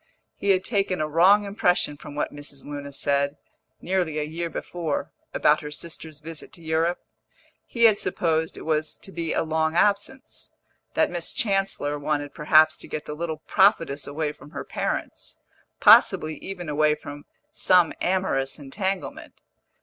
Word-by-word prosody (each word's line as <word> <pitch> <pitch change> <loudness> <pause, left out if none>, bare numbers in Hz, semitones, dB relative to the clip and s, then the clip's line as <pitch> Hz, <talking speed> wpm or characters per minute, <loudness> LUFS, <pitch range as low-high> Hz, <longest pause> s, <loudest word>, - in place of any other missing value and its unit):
He 200 - -3
had 185 -1 +4
taken 195 -4 0
a 155 - 0
wrong 185 +7 +5
impression 180 -6 +1
from 145 0 -11
what 150 - -2
Mrs. 145 -2 -8
Luna 145 -1 -6
said, 140 +1 0 0.4
nearly 175 -4 -1
a 150 - 0
year 165 +3 -4
before, 170 -1 -4 0.2
about - - +3
her 150 - -6
sister's 155 0 -6
visit 160 0 -7
to 170 - -11
Europe; 160 +2 +1 0.7
he 235 - -1
had 220 -3 +6
supposed 160 -1 -1
it - - -8
was 155 -1 -1
to 195 - -11
be 165 -3 -3
a - - +1
long 160 0 0
absence, 205 +8 0 0.5
that - - +2
Miss 175 -1 -3
Chancellor 195 -8 0
wanted 145 -1 -2
perhaps 155 +1 +4
to - - -11
get 150 - -5
the 150 - -5
little 160 0 -5
prophetess 165 -8 +2
away 150 +1 -2
from 150 0 -15
her - - -6
parents, - - -4 0.4
possibly 155 0 +6
even 180 -3 -7
away 150 0 +2
from 145 -1 -10 0.3
some 180 -3 +3
amorous 175 -8 0
entanglement. 190 +7 -4
160 Hz, 155 wpm, -25 LUFS, 150-185 Hz, 0.7 s, had